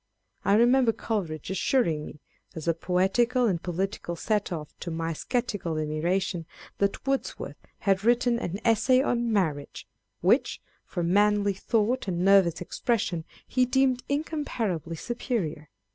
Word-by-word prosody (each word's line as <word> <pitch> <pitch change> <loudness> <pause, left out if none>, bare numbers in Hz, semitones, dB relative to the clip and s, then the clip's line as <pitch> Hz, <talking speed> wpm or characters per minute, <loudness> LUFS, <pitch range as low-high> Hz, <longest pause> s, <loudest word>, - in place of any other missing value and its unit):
I 200 - +4
remember 240 +1 +4
Coleridge 185 -9 -3
assuring 175 - +1
me, 150 - -12 0.3
as 160 0 -6
a 165 - +4
poetical 195 +9 +2
and 180 -7 +1
political 180 0 -3
set 210 +3 -1
off 155 -4 -5
to 175 - -5
my 165 0 -2
sceptical 205 -5 -2
admiration, 165 +3 -1 0.3
that 200 +4 0
Wordsworth 270 0 -2 0.3
had 195 -1 +2
written 240 +1 +3
an 190 -2 -4
Essay 240 +3 +4
on 240 -3 0
Marriage, 155 -9 -1 0.3
which, - - +2 0.3
for 175 - -3
manly 205 +3 +3
thought 225 +5 0
and 180 -1 -1
nervous 190 -4 +5
expression, 180 -4 -1 0.2
he 255 - +1
deemed 260 -1 +2
incomparably 250 - -2
superior. 170 - -3
200 Hz, 130 wpm, -27 LUFS, 170-240 Hz, 0.3 s, nervous